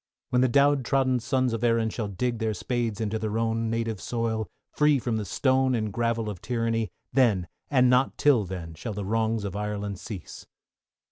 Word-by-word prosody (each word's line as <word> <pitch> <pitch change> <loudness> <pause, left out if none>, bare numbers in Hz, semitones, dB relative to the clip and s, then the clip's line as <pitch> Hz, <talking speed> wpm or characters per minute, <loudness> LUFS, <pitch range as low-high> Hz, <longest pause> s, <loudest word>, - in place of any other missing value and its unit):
When 125 - +3
the 130 - +5
down 140 +2 +4
trodden 130 -1 +1
sons 130 0 0
of 115 0 -3
Erin 115 -2 +2
shall 110 -2 -3
dig 115 +4 -2
their 110 -2 -1
spades 115 +1 -2
into 110 0 -1
their 110 0 -2
own 115 0 0
native 115 -3 -2
soil, 115 -2 -2 0.2
free 150 -1 +3
from 120 -3 -1
the 105 - -3
stone 130 +5 +2
and 110 -3 -2
gravel 115 -1 0
of 100 -5 -5
tyranny, 115 -2 -1 0.2
then, 110 -10 +3 0.2
and 130 -3 +4
not 125 +2 +3
till 140 -7 +4
then, 90 -3 -6
shall 105 +7 -6
the 100 -1 -4
wrongs 110 +1 0
of 100 -1 -4
Ireland 105 -1 -3
cease. 100 -1 -8
115 Hz, 190 wpm, -27 LUFS, 105-125 Hz, 0.2 s, the